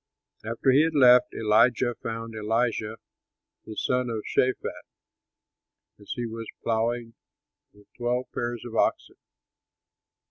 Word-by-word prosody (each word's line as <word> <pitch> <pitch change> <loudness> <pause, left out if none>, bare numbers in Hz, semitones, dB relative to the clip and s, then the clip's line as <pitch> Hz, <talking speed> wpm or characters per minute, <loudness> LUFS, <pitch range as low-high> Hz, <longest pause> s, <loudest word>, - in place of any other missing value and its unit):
After 115 +4 +1
he 135 +3 +6
had 160 0 +1
left, 125 -3 +6
Elijah 115 +3 +3
found 115 0 -5
Elisha 110 0 -1 0.7
the 110 - -8
son 125 -1 0
of 110 -2 -3
Shaphat, 130 0 -1 1.2
as 100 - -11
he 120 - -3
was 115 0 -6 0.2
ploughing 115 +1 -1 0.6
with 105 0 -21
twelve 125 +1 -1
pairs 120 -1 -3
of 115 -1 -7
oxen. - - 0
115 Hz, 115 wpm, -26 LUFS, 110-125 Hz, 1.2 s, he